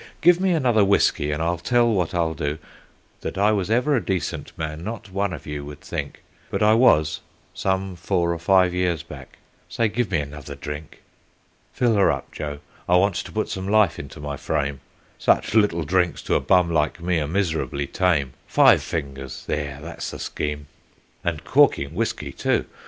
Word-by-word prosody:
Give 175 +1 +5
me 190 - +2
another 125 -9 +3
whiskey, 95 -6 +2
and 75 +2 -1
I'll 85 0 0
tell 120 +7 +3
what 90 -4 -1
I'll 85 -2 +1
do 75 -2 -3 0.6
That - - -5
I 105 +2 +4
was 100 -2 0
ever 125 +6 +2
a 120 - 0
decent 95 -4 -3
man 80 0 -4
not 105 -1 -6
one 100 0 -1
of 80 - -7
you 75 -1 -5
would 75 0 -10
think; 75 -4 -6 0.3
But - - -1
I 105 +1 +6
was, 80 -11 +4 0.3
some 95 -1 -1
four 85 -1 0
or 85 - -5
five 90 +1 +4
years 90 -3 0
back. - - -12 0.3
Say, 115 -2 +1
give 110 0 -1
me 90 - +1
another 75 -1 -6
drink. 75 +2 -8 0.7
"Fill 120 -2 +2
her 100 -5 +4
up, 70 -3 -5
Joe, 75 -1 -6 0.3
I 90 - +5
want 100 +2 +3
to - - -5
put 110 - -1
some 95 0 -4
life 105 -4 +3
into 70 0 -9
my 75 -1 -5
frame 70 0 -2 0.4
Such - - +2
little 105 -7 +3
drinks 90 +2 0
to - - -1
a - - +4
bum 90 -2 +3
like 80 +2 +1
me 85 0 0
are 75 - -2
miserably 80 -5 -1
tame; 75 -5 +1
Five - - +6
fingers 70 -4 -5
there, 75 -2 -3
that's 85 -1 -6
the - - -7
scheme 75 -1 -4 0.6
and 80 -3 -2
corking 130 - +3
whiskey, 110 +6 -2
too. - - 0
85 Hz, 185 wpm, -23 LUFS, 75-100 Hz, 0.7 s, I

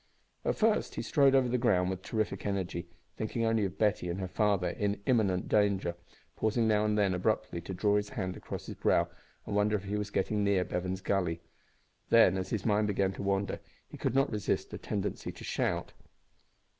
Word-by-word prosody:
At - - 0
first 220 0 +1
he - - -3
strode 140 -2 +4
over 130 -2 +4
the 125 +1 0
ground 95 -6 +2
with 95 -1 -5
terrific 110 +1 -2
energy, 95 -3 -2 0.3
thinking 115 +1 -1
only 115 -2 +2
of 95 0 -5
Betty 105 -4 +1
and 85 +3 -3
her 95 - -2
father 100 -2 +1
in 100 0 -1
imminent 100 -8 +2
danger; 100 -4 +2 0.4
pausing 110 +1 +1
now 105 -1 +3
and 105 0 +1
then 100 -2 +3
abruptly 90 -1 -1
to 90 +3 -6
draw 105 +2 +2
his 105 0 -2
hand 95 -4 -3
across - - -7
his - - -6
brow - - +2 0.4
and - - -3
wonder 105 +1 +3
if 100 - -2
he 100 +1 -2
was 105 0 -3
getting 105 +1 0
near 100 -2 +2
Bevan's 95 +1 -3
Gully. 90 -4 0 0.7
Then, 115 -5 +6
as 95 0 -3
his 110 -2 -2
mind 105 -1 +2
began 100 -2 +1
to - - -7
wander, 100 0 -1 0.3
he - - -10
could - - -1
not 135 +1 +3
resist 105 -4 -1
a - - -5
tendency 105 -1 -3
to - - -12
shout. - - -1
100 Hz, 200 wpm, -31 LUFS, 95-110 Hz, 0.7 s, Then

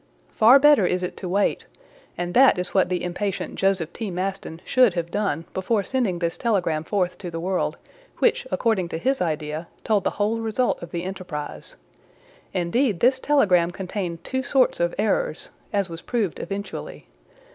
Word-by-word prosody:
Far 240 +5 +7
better 280 -9 +5
is 180 0 -1
it 180 - -4
to 180 - -5
wait; 200 +3 +1 0.5
and 175 0 -3
that 260 -4 +6
is 180 0 -3
what 190 -2 +3
the 180 -1 -1
impatient 185 +2 -3
Joseph 190 -4 0
T. 220 -3 -4
Maston 185 -2 -4
should 250 -8 +4
have 170 -1 -3
done 165 -6 -1
before 200 +3 0
sending 225 -5 0
this 170 -1 -2
telegram 180 -9 0
forth 180 0 -1
to 180 - -6
the 165 -1 -5
world, 185 +2 -1 0.4
which, - - +2
according 215 - 0
to - - -3
his 265 +9 0
idea, 155 -1 -2 0.2
told 210 -4 +1
the - - +2
whole 215 +2 +1
result 225 +3 0
of 170 - -7
the 170 0 -4
enterprise. 175 - -6 0.8
Indeed 185 +4 0
this 260 +2 +3
telegram 190 -13 +3
contained 180 -2 -5
two 260 0 -2
sorts 260 0 +2
of 170 0 0
errors, - - -1 0.2
as 200 -3 0
was 165 -1 -8
proved 220 -8 -2
eventually. 200 - -6
190 Hz, 170 wpm, -24 LUFS, 175-225 Hz, 0.8 s, Far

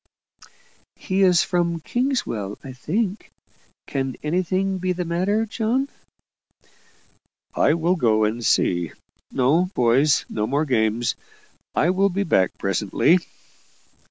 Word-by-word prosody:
"He 190 0 -2
is 180 -3 +5
from 170 -2 0
Kingswell, 165 - -2
I 135 - -8
think. 190 - -3 0.6
Can 135 -2 -3
anything 185 +4 0
be 185 0 0
the 180 0 -3
matter, 190 +6 0
John?" 235 +5 -1 1.6
"I 150 - +3
will 170 +2 +1
go 110 -9 +2
and 110 +3 -1
see. 85 -6 +1 0.4
No, 145 +8 +2
boys, 130 +5 +3
no 105 0 -2
more 145 +5 0
games 115 -3 +1 0.6
I 175 - +3
will 195 +2 +2
be 200 +2 -1
back 95 - +1
presently." 105 - +2
170 Hz, 115 wpm, -22 LUFS, 120-190 Hz, 1.6 s, is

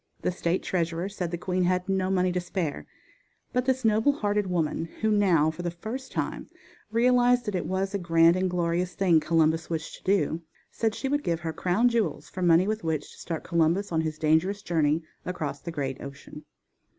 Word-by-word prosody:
The - - +1
state 175 0 -1
treasurer 170 0 -1
said 185 -4 -4
the 175 - -3
queen 180 +1 0
had 180 +1 0
no 190 -1 0
money 185 -1 +2
to 180 - 0
spare, 175 -4 -3 0.7
but 250 0 +1
this 260 -2 0
noble 220 +6 +4
hearted 205 -6 0
woman, 165 -3 -1 0.2
who 220 0 +2
now, 180 -7 +3
for 160 - -8
the 175 - -1
first 225 +10 -7
time, - - -3 0.4
realized 245 +1 +4
that 210 - -2
it 180 - -2
was 190 +1 -1
a 200 - 0
grand 165 -1 +4
and 185 0 0
glorious 175 0 -1
thing 175 -5 +4
Columbus 160 +1 +1
wished 160 -2 -4
to - - -23
do, 175 -4 +1 0.3
said 225 -1 -1
she 270 - -3
would 290 +2 +1
give 170 0 -1
her 165 -1 -3
crown 185 +9 +2
jewels 215 -11 -1
for 185 - -6
money 175 0 +5
with 215 -2 -2
which 160 -3 -2
to - - -16
start 165 -2 -4
Columbus 170 +4 +1
on 160 -1 +1
his 155 -1 -3
dangerous 160 +6 +1
journey 160 -1 +1 0.2
across 160 -5 -4
the 170 - -6
great 135 -5 -3
ocean. 140 +2 -10
180 Hz, 200 wpm, -27 LUFS, 165-205 Hz, 0.7 s, money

